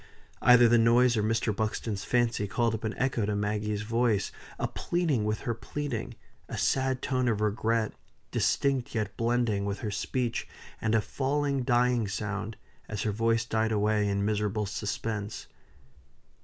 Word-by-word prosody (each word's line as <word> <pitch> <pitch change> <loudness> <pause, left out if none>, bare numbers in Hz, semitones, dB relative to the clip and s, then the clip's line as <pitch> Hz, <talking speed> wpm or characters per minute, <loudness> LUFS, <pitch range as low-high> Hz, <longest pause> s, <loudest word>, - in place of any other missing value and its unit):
Either 125 -1 +7
the 115 0 +5
noise 120 +2 +5
or 110 - +1
Mr. 110 0 0
Buxton's 110 -1 -2
fancy 120 -4 +1
called 115 +3 +1
up 110 - -4
an 110 0 -3
echo 130 -4 0
to 105 0 0
Maggie's 105 0 -1
voice 115 -2 +1 0.3
a - - -1
pleading 160 -11 0
with 105 0 -1
her 120 - -1
pleading 120 0 -4 0.3
a - - -4
sad 130 -1 +1
tone 130 -2 0
of 110 -3 +1
regret, 110 +1 0 0.4
distinct 135 -4 +1
yet 105 -2 -2
blending 115 -3 +1
with 100 0 -3
her 105 - -2
speech, 120 +4 -2 0.3
and 110 0 +1
a 110 - +4
falling, 140 +5 -1
dying 120 -2 +2
sound, 105 +2 -4 0.3
as 105 -2 -3
her 110 - 0
voice 115 +1 +1
died 110 -1 0
away 105 0 +2
in 100 0 0
miserable 105 0 0
suspense. 105 +1 -4
110 Hz, 155 wpm, -29 LUFS, 105-120 Hz, 0.4 s, Either